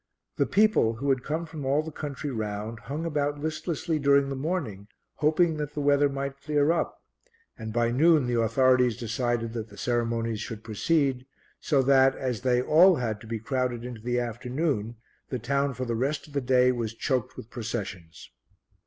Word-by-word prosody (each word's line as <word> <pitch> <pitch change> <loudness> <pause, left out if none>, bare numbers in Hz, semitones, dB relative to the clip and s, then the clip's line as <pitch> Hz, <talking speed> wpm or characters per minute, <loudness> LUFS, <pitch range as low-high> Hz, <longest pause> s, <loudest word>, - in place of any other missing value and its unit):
The - - +2
people, 205 - +3
who 140 +5 -3
had 130 -2 +2
come 155 +5 -3
from 160 -3 -8
all 140 +3 +1
the 160 - -7
country 145 -1 -5
round, 110 0 -4
hung 145 +7 -5
about 145 -2 -1
listlessly 160 +1 -2
during 140 -1 +3
the 135 - -3
morning, 130 - -3 0.3
hoping 155 +2 +2
that 150 -1 -4
the - - -2
weather 145 0 +3
might 140 0 -5
clear 150 +1 +2
up 170 - -1 0.6
and 110 -1 -6
by 120 +1 +1
noon 155 +2 +4
the 120 -1 +1
authorities 125 +1 +3
decided 115 0 -2
that 110 -2 -5
the 100 - -14
ceremonies 115 -2 -1
should 110 0 -7
proceed, 135 +3 0 0.3
so 140 -3 +2
that, 135 0 +5
as 125 -4 -3
they 125 -1 +2
all 175 +6 +6
had 110 -6 -3
to 115 - -12
be 115 0 -3
crowded 125 +1 -2
into 120 -3 -7
the 120 +2 0
afternoon, 120 0 -2 0.3
the 130 - -2
town 140 +3 -1
for 130 +2 -3
the 120 - -2
rest 135 +6 -1
of 150 - -16
the 140 - 0
day 125 0 +4
was 115 -3 -3
choked 130 -1 -2
with 110 - -10
processions. 100 -8 -6
130 Hz, 185 wpm, -27 LUFS, 115-145 Hz, 0.6 s, all